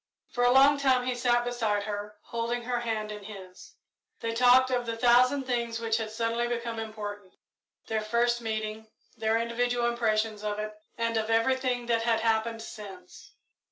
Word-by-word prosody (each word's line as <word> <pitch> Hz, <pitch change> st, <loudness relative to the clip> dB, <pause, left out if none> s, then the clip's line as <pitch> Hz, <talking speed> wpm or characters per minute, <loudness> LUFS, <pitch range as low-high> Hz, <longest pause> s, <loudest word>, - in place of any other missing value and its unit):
For 245 Hz, -, 0 dB
a 245 Hz, -, +5 dB
long 275 Hz, +2 st, +6 dB
time 260 Hz, -3 st, +3 dB
he 255 Hz, -, 0 dB
sat 240 Hz, 0 st, +1 dB
beside 225 Hz, -4 st, 0 dB
her, 210 Hz, 0 st, -5 dB
holding 235 Hz, +1 st, -3 dB
her 245 Hz, 0 st, -1 dB
hand 220 Hz, -2 st, -3 dB
in 210 Hz, -1 st, -8 dB
his. 190 Hz, -3 st, -11 dB, 0.4 s
They 230 Hz, 0 st, -3 dB
talked 250 Hz, +2 st, +5 dB
of 245 Hz, -1 st, 0 dB
the 230 Hz, 0 st, -3 dB
thousand 250 Hz, +3 st, +4 dB
things 235 Hz, -2 st, -2 dB
which 225 Hz, -1 st, 0 dB
had 220 Hz, -1 st, -3 dB
suddenly 230 Hz, +2 st, -1 dB
become 235 Hz, -1 st, -3 dB
important 205 Hz, -3 st, -7 dB, 0.5 s
their 220 Hz, -1 st, -1 dB
first 235 Hz, +2 st, +1 dB
meeting, 220 Hz, -1 st, -4 dB, 0.3 s
their 220 Hz, -1 st, +1 dB
individual 240 Hz, +1 st, 0 dB
impressions 220 Hz, -2 st, 0 dB
of 210 Hz, -1 st, -2 dB
it, 215 Hz, 0 st, -4 dB, 0.2 s
and 230 Hz, -1 st, 0 dB
of 220 Hz, 0 st, -1 dB
everything 245 Hz, +2 st, +1 dB
that 230 Hz, -1 st, +1 dB
had 225 Hz, -1 st, +1 dB
happened 225 Hz, 0 st, 0 dB
since. 195 Hz, -5 st, -11 dB
230 Hz, 170 wpm, -28 LUFS, 215-245 Hz, 0.5 s, long